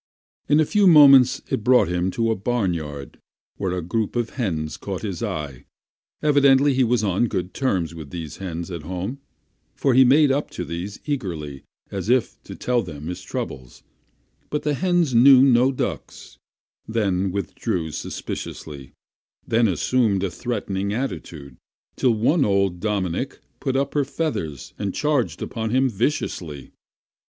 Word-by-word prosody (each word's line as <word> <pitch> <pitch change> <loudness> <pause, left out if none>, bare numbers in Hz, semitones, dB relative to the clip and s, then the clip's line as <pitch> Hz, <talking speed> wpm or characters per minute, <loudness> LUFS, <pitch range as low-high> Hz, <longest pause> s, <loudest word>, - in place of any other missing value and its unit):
In 150 +1 +5
a 155 - +4
few 205 +4 +3
moments 140 -6 +7
it 110 - -1
brought 125 -3 +5
him 90 +1 -1
into 115 +4 0
a - - +1
barnyard, 85 - -3 0.4
where 95 -2 -2
a 90 - -3
group 110 +6 -2
of 120 -2 -1
hens 80 - -3
caught 95 -1 -6
his 95 -5 -4
eye. 70 -5 -5 0.6
Evidently 140 -1 +4
he 130 0 +3
was 120 -2 +1
on 100 +4 +1
good 95 -3 -3
terms 95 -11 -1
with 80 -4 -9
hens 85 +2 -6
at 85 -2 -5
home, 95 - -5 0.6
for 135 - +1
he 130 +2 +7
made 140 +3 +5
up 140 +2 -1
to - - -5
these 85 +5 -6
eagerly 85 - -4 0.3
as 100 +1 -4
if 125 -1 +1
to - - -8
tell 125 -1 0
them 80 -4 -7
his 90 - -5
troubles; 65 -2 -6 0.7
but 150 - -2
the 150 - 0
hens 175 -2 +1
knew 130 +2 +7
not 130 0 +4
ducks; - - -5 0.5
they 110 -3 0
withdrew 90 -3 -2
suspiciously, 70 -2 -7 0.5
then 115 0 +3
assumed 100 +2 +1
a 95 - -1
threatening 100 -2 -3
attitude, 80 - -5 0.4
till 125 -3 +2
one 140 +8 +2
old 100 -4 +1
"dominic" 95 -4 -2 0.2
put 135 - -2
up 140 +1 0
her 145 - +2
feathers 110 - -4
and 100 -2 -3
charged 150 -5 0
upon 110 -2 -4
him 130 +3 +3
viciously. 95 - -3
105 Hz, 150 wpm, -23 LUFS, 85-130 Hz, 0.7 s, moments